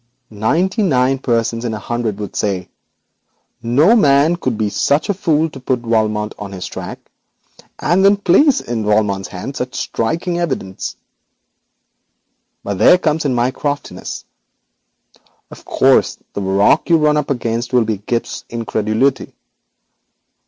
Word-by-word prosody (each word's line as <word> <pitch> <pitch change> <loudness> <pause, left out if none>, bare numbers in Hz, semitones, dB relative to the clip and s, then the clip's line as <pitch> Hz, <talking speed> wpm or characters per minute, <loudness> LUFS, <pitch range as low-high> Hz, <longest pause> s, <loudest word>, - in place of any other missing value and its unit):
Ninety 170 - 0
nine 135 -7 +2
persons 115 -2 -1
in 115 -2 -2
a - - -4
hundred 115 -1 -3
would 105 -3 -7
say: 95 -3 -2 0.9
"No 140 - +4
man 145 -4 +4
could 130 -9 -2
be 110 -1 0
such 145 - 0
a - - +3
fool 160 -5 +1
as 160 - -5
to 135 - -10
put 125 -1 -1
Valmont 110 -2 0
on 100 -1 -7
his 90 -1 -6
own - - -8
track, - - -7 0.8
and 180 +4 +2
then 200 +1 +5
place 245 - +4
in 115 -2 -3
Valmont's 105 -2 +1
hands 95 +10 -7
such 125 0 -4
striking 170 +8 -2
evidence." 130 - -3 1.7
But 100 -2 -4
there 180 - +7
comes 160 -3 -1
in 130 -3 +1
my 120 +2 +1
craftiness. 145 +1 -5 1.3
Of - - -13
course, - - +3 0.2
the 100 - -3
rock 100 - +2
you 165 - +6
run 150 -1 +3
up 150 -2 -1
against 120 -3 -2
will 125 -3 +3
be 110 -2 -2
Gibbes's 115 +3 -3
incredulity. 115 +2 -1
120 Hz, 145 wpm, -17 LUFS, 110-150 Hz, 1.7 s, there